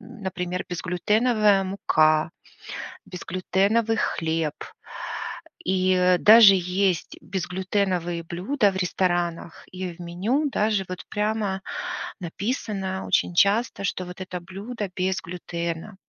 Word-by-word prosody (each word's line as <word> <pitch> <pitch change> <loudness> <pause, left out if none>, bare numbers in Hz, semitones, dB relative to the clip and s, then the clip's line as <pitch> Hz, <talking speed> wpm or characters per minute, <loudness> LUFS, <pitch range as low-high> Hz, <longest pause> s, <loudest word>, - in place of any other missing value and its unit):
например: 180 -3 -5
безглютеновая 205 +3 +2
мука, 155 -5 +2 0.8
безглютеновый 190 +5 0
хлеб 160 -5 -1 1.1
и, 185 0 +2
э, 180 0 +4
даже 215 -2 +9
есть 180 -1 0
безглютеновые 185 -2 -1
блюда 200 - +1
в - - -9
ресторанах, 175 -2 -1
и 185 -1 -5
в - - -24
меню 210 - -1
даже 210 -4 +1
вот 185 - -6
прямо 210 -2 -1 0.6
написано 190 - -3
очень 175 - +2
часто, 200 +3 +3
что 185 - -2
вот 180 +1 -9
это 180 -1 -5
блюдо 200 +4 -6
без 185 0 0
глютена. 170 0 -5
185 Hz, 105 wpm, -25 LUFS, 175-205 Hz, 1.1 s, даже